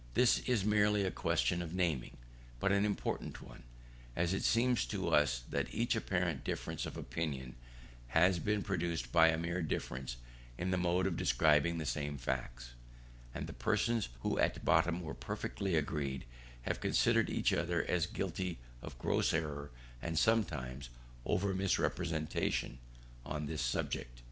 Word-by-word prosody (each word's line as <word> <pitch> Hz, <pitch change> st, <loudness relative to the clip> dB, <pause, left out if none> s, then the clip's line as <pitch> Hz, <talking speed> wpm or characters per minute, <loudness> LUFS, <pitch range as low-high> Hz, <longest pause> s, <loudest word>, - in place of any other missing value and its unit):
This 125 Hz, -2 st, +5 dB
is 110 Hz, -6 st, +2 dB
merely 105 Hz, -1 st, +3 dB
a 95 Hz, -, 0 dB
question 80 Hz, +3 st, +1 dB
of 85 Hz, 0 st, -5 dB
naming, 85 Hz, -9 st, 0 dB, 0.4 s
but 100 Hz, -, +2 dB
an 100 Hz, +1 st, +3 dB
important 105 Hz, -1 st, -2 dB
one, -, -, -12 dB, 0.5 s
as 85 Hz, +2 st, +1 dB
it 95 Hz, -, 0 dB
seems 120 Hz, +1 st, +3 dB
to 95 Hz, -5 st, -2 dB
us 75 Hz, -6 st, +3 dB
that -, -, -2 dB
much 120 Hz, +1 st, +2 dB
apparent 90 Hz, -, -1 dB
difference -, -, -3 dB
of -, -, -7 dB
opinion 70 Hz, -6 st, -4 dB, 0.5 s
has 85 Hz, +7 st, +4 dB
been 105 Hz, +4 st, 0 dB
produced 85 Hz, -9 st, -2 dB
by 80 Hz, +2 st, +7 dB
a 80 Hz, 0 st, +3 dB
mere 85 Hz, +2 st, -2 dB
difference 65 Hz, -5 st, -3 dB, 0.4 s
in 90 Hz, +2 st, -1 dB
the 95 Hz, -, +2 dB
mode 90 Hz, +1 st, +2 dB
of 95 Hz, -3 st, 0 dB
describing 75 Hz, +6 st, +3 dB
the 80 Hz, -, -3 dB
same 75 Hz, -1 st, -2 dB
facts, -, -, -4 dB, 0.6 s
and -, -, -3 dB
that -, -, -9 dB
persons 115 Hz, -, +1 dB
who -, -, 0 dB
at -, -, +1 dB
bottom 85 Hz, +1 st, +3 dB
were 80 Hz, -2 st, -5 dB
perfectly 95 Hz, -3 st, -3 dB
agreed, 70 Hz, -4 st, -1 dB, 0.4 s
have -, -, -2 dB
considered -, -, +3 dB
each -, -, +1 dB
other 85 Hz, 0 st, +1 dB
as 85 Hz, -2 st, +1 dB
guilty 90 Hz, -1 st, -3 dB, 0.2 s
of -, -, -8 dB
gross -, -, +1 dB
error, 75 Hz, -3 st, -2 dB, 0.3 s
and 85 Hz, -1 st, -3 dB
sometimes 75 Hz, -, +1 dB, 0.4 s
oven 95 Hz, 0 st, +1 dB
misrepresentation, 80 Hz, -8 st, 0 dB, 0.4 s
on 75 Hz, +2 st, -3 dB
this 75 Hz, +1 st, -3 dB
subject. -, -, -2 dB
85 Hz, 155 wpm, -34 LUFS, 70-95 Hz, 0.6 s, by